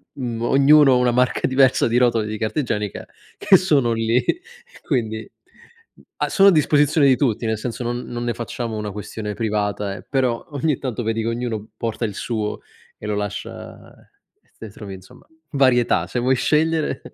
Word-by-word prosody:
mhmm, 120 -4 -4
ognuno 135 +2 +5
una 125 0 +2
marca 125 +1 +1
diversa 130 -1 +3
di 120 - -1
rotoli 120 -3 +2
di 110 0 -4
carta 110 +8 -2
igienica 105 -6 -3 0.3
che 205 -2 +5
sono 145 -10 +2
lì. 115 +2 +1 0.6
Quindi, 110 -6 -2 0.7
mhmm, - - -21
a - - 0
sono 195 0 +6
a - - +5
disposizione 150 -1 +3
di 130 - +5
tutti, 120 -5 0
nel 110 0 0
senso 120 +2 -5
non 120 +1 -2
non 120 0 -5
ne 120 - -1
facciamo 115 0 -5
una 105 -1 -4
questione 105 +1 -6
privata 105 -3 -2
eh, - - -10
però 130 -4 0
ogni 145 0 0
tanto 125 -3 -4
vedi 115 0 -1
che 110 - -3
ognuno 115 -3 -4
porta 115 +1 -3
il 105 -3 -5
suo 110 -3 -3 0.4
e - - -10
lo 105 - -1
lascia 105 -1 -6 0.5
e - - -37
te 110 - -9
trovi 100 -1 -9
insomma 95 0 -16 0.3
varietà, 130 -3 +3
se 125 - -3
vuoi 130 +2 +2
scegliere. 155 +2 +1
120 Hz, 180 wpm, -21 LUFS, 110-135 Hz, 0.7 s, sono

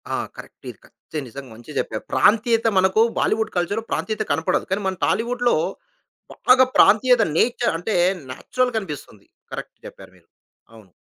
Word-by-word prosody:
ఆ! - - -1 0.2
కరెక్టే. - - -10
కరెక్టే. 155 - -9
నిజంగా 130 +1 -10
మంచిగా 120 +6 -12
జెప్పారు. - - -4
ప్రాంతీయత 225 +1 +3
మనకు 190 +3 +3 0.2
బాలీవుడ్ 220 0 0
కల్చర్‌లో 205 +6 -1
ప్రాంతీయత 215 0 -2
కనపడదు. 160 +3 0
కానీ 200 +2 0
మన 190 - -1
టాలీవుడ్‌లో 240 +1 +1 0.9
బాగా 260 +1 +7
ప్రాంతీయత 230 +3 +5
నేచర్ 240 -4 +1
అంటే 195 +5 -3 0.4
నేచురల్‌గా 250 - -1
అనిపిస్తుంది. 140 - -9 0.3
కరెక్ట్ - - -7
జెప్పారు - - -12
మీరు. - - -27 0.5
అవును. 105 -5 -17
215 Hz, 135 wpm, -22 LUFS, 160-235 Hz, 0.9 s, బాగా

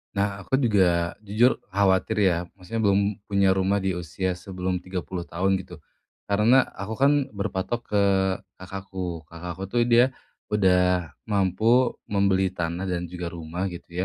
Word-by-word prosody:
Nah 100 0 -1
aku 135 - 0
juga, 90 -8 +2
jujur 110 +5 +3
khawatir 100 +2 +2
ya, - - +1 0.2
maksudnya 95 +4 -5
belum 100 0 +4 0.3
punya 100 -2 +3
rumah 95 +1 +2
di 95 - +1
usia 90 +2 -2
sebelum 90 -1 -3
30 90 -1 -5
tahun 95 +2 0
gitu, - - -11 0.5
karena 110 +6 +5
aku 100 +3 -4
kan 140 +5 +4 0.2
berpatok 100 +3 -2
ke 105 -1 +3 0.5
kakakku. 95 -3 -6
Kakakku 85 +2 -7
tuh 120 +4 +1
dia 120 +2 +4 0.3
udah 90 -4 +2 0.2
mampu 110 +5 +3 0.2
membeli 100 -1 +2
tanah 85 +2 -2
dan 90 -1 -2
juga 90 -1 -5
rumah 85 +3 -4
gitu 85 -1 -9
95 Hz, 140 wpm, -25 LUFS, 90-100 Hz, 0.5 s, karena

